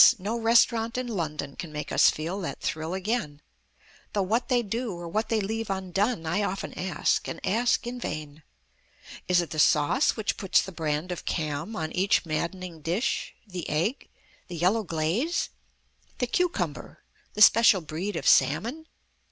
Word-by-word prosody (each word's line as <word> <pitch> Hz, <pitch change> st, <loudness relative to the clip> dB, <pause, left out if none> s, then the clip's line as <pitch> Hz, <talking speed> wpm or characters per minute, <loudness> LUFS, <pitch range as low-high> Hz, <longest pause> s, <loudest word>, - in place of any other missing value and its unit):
no 205 Hz, +4 st, -3 dB
restaurant 230 Hz, 0 st, +3 dB
in 255 Hz, -, -1 dB
London 155 Hz, -, -4 dB
Can 165 Hz, -, -7 dB
make 150 Hz, 0 st, -5 dB
us -, -, +6 dB
feel 170 Hz, +6 st, -3 dB
that 175 Hz, -, -5 dB
thrill 160 Hz, +3 st, -3 dB
again; 190 Hz, -7 st, -2 dB, 0.7 s
Though 200 Hz, -, +1 dB
what 225 Hz, +6 st, 0 dB
they 245 Hz, -2 st, +3 dB
do 230 Hz, +1 st, -3 dB
or 170 Hz, 0 st, -7 dB
what 215 Hz, +6 st, -2 dB
leave 220 Hz, 0 st, -1 dB
undone 190 Hz, 0 st, -1 dB
I 170 Hz, +6 st, 0 dB
often 195 Hz, -1 st, -3 dB
ask, 185 Hz, 0 st, 0 dB
and -, -, -5 dB
ask 235 Hz, +7 st, +1 dB
in 245 Hz, +1 st, -5 dB
vain. 155 Hz, -6 st, -6 dB, 0.9 s
Is 180 Hz, -1 st, +4 dB
it 170 Hz, -, -6 dB
the 155 Hz, -, -3 dB
sauce 150 Hz, -, +3 dB
which 220 Hz, -, -1 dB
puts 195 Hz, -, +3 dB
the 190 Hz, -, -7 dB
brand 160 Hz, 0 st, -2 dB
of 180 Hz, -, -5 dB
Cam 155 Hz, +6 st, -3 dB
on 160 Hz, -3 st, -3 dB
Each 190 Hz, +1 st, +2 dB
maddening 170 Hz, +1 st, -4 dB
dish? 175 Hz, -, -1 dB
The 180 Hz, -5 st, -6 dB
egg? 175 Hz, -, -1 dB, 0.4 s
The 175 Hz, -, -7 dB
yellow 185 Hz, +7 st, +2 dB
glaze? 175 Hz, -, -1 dB, 0.7 s
The 250 Hz, -, 0 dB
cucumber? 355 Hz, +8 st, -2 dB, 0.3 s
The 210 Hz, -, +7 dB
special 220 Hz, -5 st, +6 dB
breed 170 Hz, +6 st, -4 dB
of -, -, -2 dB
salmon? 230 Hz, -, +3 dB
190 Hz, 160 wpm, -27 LUFS, 160-225 Hz, 0.9 s, The